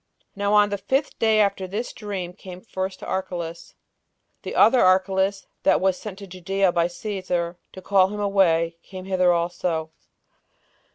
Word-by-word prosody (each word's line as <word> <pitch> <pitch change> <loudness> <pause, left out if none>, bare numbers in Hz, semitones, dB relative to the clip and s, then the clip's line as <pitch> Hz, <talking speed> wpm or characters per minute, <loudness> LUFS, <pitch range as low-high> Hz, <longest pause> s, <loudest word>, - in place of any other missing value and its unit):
Now 200 +1 +1
on 205 0 +5
the 200 -1 -3
fifth 270 +8 -1
day 220 -1 +3
after 200 -2 +1
this 210 +6 -4
dream 195 -5 -5
came 180 -1 -10
first 190 -2 -4
to - - -7
Archelaus, 175 -3 -5 0.7
the - - -6
other 250 +2 +6
Archelaus, 190 +1 +2 0.2
that - - +3
was 190 -1 +2
sent 195 0 -8
to 200 - -9
Judea 190 +1 0
by 170 0 +2
Cæsar 180 -2 -3
to 190 - -10
call 190 -1 +4
him 210 +2 -6
away, 170 -5 +2
came 185 -1 -10
hither 185 -2 +3
also. 170 -2 -1
190 Hz, 160 wpm, -24 LUFS, 180-200 Hz, 0.7 s, other